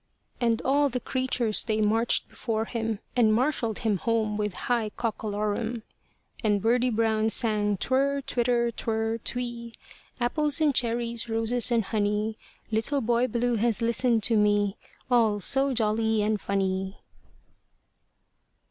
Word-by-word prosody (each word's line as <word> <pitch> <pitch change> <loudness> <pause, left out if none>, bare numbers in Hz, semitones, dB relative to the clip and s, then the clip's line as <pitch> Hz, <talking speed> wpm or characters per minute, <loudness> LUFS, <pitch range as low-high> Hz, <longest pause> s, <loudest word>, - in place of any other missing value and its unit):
And 230 -2 +1
all 285 +1 +2
the 250 0 -2
creatures 250 -4 0
they 220 -1 -1
marched 225 +2 +2
before 220 -2 -3
him, 225 -2 -3 0.2
And 230 -3 +4
marshalled 240 -4 0
him 210 -3 +2
home 220 +2 0
with 210 -2 -2
a - - -9
high 235 -3 0
cockolorum. 215 +1 -2 0.6
And 205 -2 +2
Birdie 240 +4 +2
Brown 220 -1 +1
sang 210 -3 +1
Twirrrr 275 +5 0
twitter 240 -1 +1
twirrrr 225 0 -2
twee 235 -1 -4 0.4
Apples 290 +4 +1
and 305 -3 +3
cherries, 235 -1 0
roses 225 +2 +1
and 230 -2 +2
honey; 210 +1 -1 0.4
Little 225 +6 0
Boy 240 +1 +1
Blue 240 0 0
has 230 0 +1
listened 235 -1 +2
to 225 0 +4
me 205 -1 +2 0.4
All 225 -4 +3
so 270 +7 +2
jolly 220 -2 +1
and 215 -1 0
funny. 190 0 -2
225 Hz, 135 wpm, -26 LUFS, 215-240 Hz, 0.6 s, And